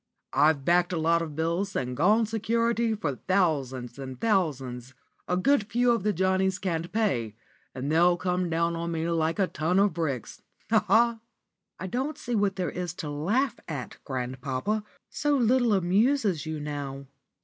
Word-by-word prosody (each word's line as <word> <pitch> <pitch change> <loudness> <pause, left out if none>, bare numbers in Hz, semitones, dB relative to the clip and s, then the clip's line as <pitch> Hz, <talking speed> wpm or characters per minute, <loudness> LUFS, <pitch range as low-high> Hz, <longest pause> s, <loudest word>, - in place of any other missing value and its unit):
"I've 145 -1 +3
backed 175 +1 +3
a - - 0
lot 165 +1 +2
of 155 -3 -5
bills, 170 +5 -1
and 125 -1 -2
gone 210 - +4
security 230 +1 0
for 145 - -3
thousands 140 -10 0
and 130 -2 -7
thousands. 130 - -1 0.3
A 180 - +1
good 240 +2 +2
few 240 +3 +3
of 235 - +1
the 210 +2 +1
Johnnies 190 0 +1
can't 175 -3 -3
pay, 130 - 0 0.4
and 135 +3 -3
they'll 175 +2 +4
come 180 0 -1
down 170 +1 0
on 170 0 -3
me 165 0 -1
like 165 0 0
a 195 - +3
ton 175 +1 -1
of 200 -1 +4
bricks. 150 -8 -3 0.3
Ha, - - +4
ha!" 235 0 +4 0.6
"I - - -5
don't 265 +10 -2
see 245 -5 -5
what 200 -3 +1
there 185 -2 -2
is 180 -2 -4
to 155 -5 -5
laugh 205 - 0
at, 145 -6 -6
grandpapa. 130 - -3 0.3
So 290 -1 +1
little 245 -1 +3
amuses 195 - +2
you 155 -1 -3
now." 140 -2 -5
175 Hz, 170 wpm, -27 LUFS, 150-210 Hz, 0.6 s, gone